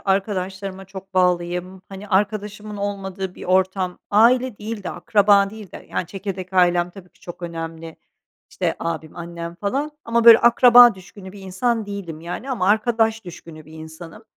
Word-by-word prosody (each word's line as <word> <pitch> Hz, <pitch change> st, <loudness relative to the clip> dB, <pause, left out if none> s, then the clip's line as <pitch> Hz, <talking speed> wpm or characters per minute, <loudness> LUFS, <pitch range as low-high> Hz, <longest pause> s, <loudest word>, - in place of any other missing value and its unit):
arkadaşlarıma 195 Hz, -1 st, -3 dB
çok 190 Hz, 0 st, -12 dB
bağlıyım, 180 Hz, +1 st, 0 dB
hani, 195 Hz, +1 st, -10 dB
arkadaşımın 210 Hz, +1 st, -2 dB
olmadığı 195 Hz, -2 st, -5 dB
bir -, -, -10 dB
ortam 185 Hz, 0 st, 0 dB
aile 240 Hz, +2 st, +3 dB
değil 215 Hz, 0 st, -6 dB
de -, -, -5 dB
akraba 205 Hz, -3 st, +3 dB
değil 215 Hz, -4 st, -11 dB
de -, -, -11 dB
Yani -, -, -2 dB
çekirdek 190 Hz, 0 st, -7 dB
ailem 175 Hz, -1 st, +2 dB
tabii 180 Hz, -1 st, -14 dB
ki -, -, -31 dB
çok 175 Hz, 0 st, -10 dB
önemli, 165 Hz, -1 st, -7 dB, 0.5 s
işte, -, -, -2 dB
abim, 160 Hz, -2 st, -5 dB
annem 170 Hz, 0 st, -7 dB
falan 265 Hz, +11 st, -3 dB
ama, 230 Hz, 0 st, 0 dB
böyle, 230 Hz, -1 st, +10 dB
akraba 240 Hz, -1 st, +7 dB
düşkünü 190 Hz, +1 st, -13 dB
bir 200 Hz, -, -12 dB
insan 215 Hz, +4 st, -2 dB
değilim, 190 Hz, -6 st, -7 dB
yani, 175 Hz, +11 st, -6 dB
ama 210 Hz, -8 st, -1 dB
arkadaş 225 Hz, 0 st, +1 dB
düşkünü 165 Hz, -3 st, -11 dB
bir 155 Hz, -, -16 dB
insanım. 160 Hz, +3 st, -11 dB
190 Hz, 160 wpm, -21 LUFS, 175-210 Hz, 0.5 s, böyle